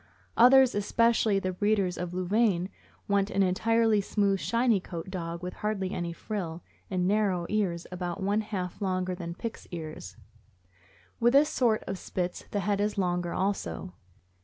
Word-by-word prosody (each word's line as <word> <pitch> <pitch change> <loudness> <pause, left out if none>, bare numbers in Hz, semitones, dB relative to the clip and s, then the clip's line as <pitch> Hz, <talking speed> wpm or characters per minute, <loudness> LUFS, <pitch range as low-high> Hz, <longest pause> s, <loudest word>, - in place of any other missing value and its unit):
Others, 255 +2 +7
especially 220 0 +2
the 185 -1 -1
breeders 200 -2 +1
of 180 -1 -4
Louvain, 185 0 +1 0.4
want 200 0 +2
an 195 -1 +2
entirely 220 +3 +2
smooth, 200 -1 +1
shiny 235 -1 +2
coated 175 0 -7
dog 170 -2 -5
with 180 - -4
hardly 200 -3 -2
any 175 -1 -3
frill, 175 -2 -5 0.3
and 180 -2 0
narrow 195 -4 +1
ears, 185 -5 0
about 180 +1 -4
one 205 +2 +1
half 190 -4 -5
longer 185 -1 -1
than 170 -2 -6
Pick's 230 +3 -6
ears. 155 - -7 1.0
With 240 +1 +4
this 290 +2 +6
sort 235 -7 +1
of 190 -1 -5
Spits 180 -1 -4
the 205 - -1
head 200 0 0
is 210 0 -1
longer 175 -2 0
also. 185 - -2
195 Hz, 155 wpm, -28 LUFS, 180-215 Hz, 1.0 s, Others